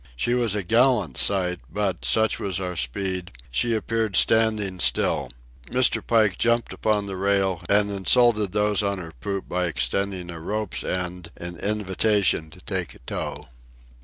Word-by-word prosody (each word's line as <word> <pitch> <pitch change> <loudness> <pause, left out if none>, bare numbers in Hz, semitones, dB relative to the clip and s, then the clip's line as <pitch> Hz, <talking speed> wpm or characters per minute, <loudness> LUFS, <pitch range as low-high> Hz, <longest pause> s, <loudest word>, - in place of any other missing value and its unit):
She 120 - 0
was 120 -4 +1
a 105 - -2
gallant 115 - +2
sight, 90 0 +2
but, 95 -11 -2
such 110 - +2
was 95 -3 -2
our 90 -1 -4
speed, 90 +6 -2 0.2
she 115 - +1
appeared 110 -1 -1
standing 110 -4 +2
still. - - +1 0.4
Mr. 125 -1 +3
Pike 110 -5 +2
jumped 120 -1 +1
upon 105 -2 0
the 100 -1 -5
rail 95 -2 +1
and 100 0 +4
insulted 105 +1 +3
those 105 0 +1
on 100 -1 -1
her 80 -3 -8
poop 100 -1 -4
by 90 0 -1
extending 90 +6 -2
a 85 - -8
rope's 105 +4 -3
end 90 -1 -4
in 85 0 -6
invitation 100 -4 +1
to - - -16
take - - -4
a - - -17
tow. - - -5
100 Hz, 160 wpm, -24 LUFS, 90-110 Hz, 0.4 s, and